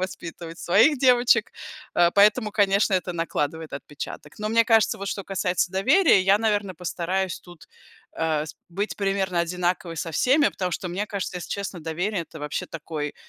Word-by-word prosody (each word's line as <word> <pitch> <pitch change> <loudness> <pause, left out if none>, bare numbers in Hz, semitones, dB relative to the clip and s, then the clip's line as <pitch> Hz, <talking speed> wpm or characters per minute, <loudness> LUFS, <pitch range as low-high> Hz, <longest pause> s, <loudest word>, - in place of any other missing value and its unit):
воспитывать 170 -2 -6
своих 225 - +4
девочек, 250 -2 +4 0.4
э, 175 0 +4
поэтому, 210 +2 +4
конечно, 200 -1 +3
это 180 -1 -1
накладывает 160 -2 -3
отпечаток. 145 +1 -8
Но 215 0 -2
мне 230 +1 +4
кажется, 225 -2 +3
вот, 200 0 -4
что 200 - -4
касается 180 -2 -1
доверия, 265 - +4
я, 195 +2 +4
наверное, 205 -4 0
постараюсь 180 +2 -3
тут, 175 -3 -15 0.5
э, 155 -1 0
с 155 - -9
быть 200 +5 -3
примерно 195 -3 0
одинаковой 175 0 -2
со 165 0 -4
всеми, 285 - +3
потому 180 -1 -3
что 180 - -3
мне 190 +4 -3
кажется, 200 -3 -4
если 175 - -9
честно, 200 -3 -4
доверие- 175 +5 -2
это, 160 - -12
вообще, 150 0 -4
такой 150 -2 -5
185 Hz, 165 wpm, -24 LUFS, 170-205 Hz, 0.5 s, своих